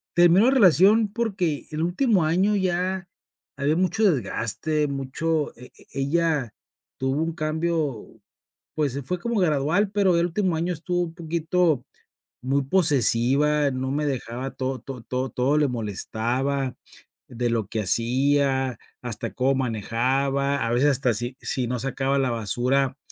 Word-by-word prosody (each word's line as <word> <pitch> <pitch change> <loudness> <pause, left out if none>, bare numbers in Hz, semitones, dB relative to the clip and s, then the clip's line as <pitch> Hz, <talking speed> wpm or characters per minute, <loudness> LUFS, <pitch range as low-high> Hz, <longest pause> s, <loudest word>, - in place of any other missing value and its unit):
terminó 175 +5 +6
la 260 - +5
relación 205 - +5
porque 190 -10 -1
el 155 +1 -3
último 190 - +2
año 190 +6 +2
ya 185 0 -1 0.5
había 145 +3 +1
mucho 200 +3 +2
desgaste 145 - -1
mucho, 145 +3 -2
e 125 - -12
e - - -17
ella 150 -4 0 0.5
tuvo 135 +4 0
un 165 0 -3
cambio. 155 -5 -2 0.7
Pues, 145 -4 0
se 140 -1 -4
fue 180 +6 -3
como 235 0 -1
gradual, 165 +6 +1
pero 190 -4 +2
el 170 +1 +2
último 180 -1 0
año 175 +2 -1
estuvo 175 +2 -2
un 165 -1 -6
poquito 170 -2 0 0.6
muy 135 +2 0
posesiva. 145 -2 +3
No 130 +1 -3
me 150 +1 -1
dejaba, 130 -1 -3
to 130 -1 -3
to 130 -2 -8
to 130 +1 -3
todo 135 +4 +1
le 150 -2 +3
molestaba 125 +5 -2 0.5
de 120 0 -2
lo 115 -3 0
que 110 +1 -2
hacía, 130 +3 +1 0.2
hasta 115 -3 -5
cómo 135 +1 +1
manejaba, 135 +3 0
a 115 - -1
veces 135 +4 +3
hasta 125 -3 +1
si 120 +4 -3
si 130 -3 -1
no 125 0 -2
sacaba 135 +1 -1
la 130 -2 +1
basura, 125 +5 0
140 Hz, 150 wpm, -24 LUFS, 130-170 Hz, 0.7 s, terminó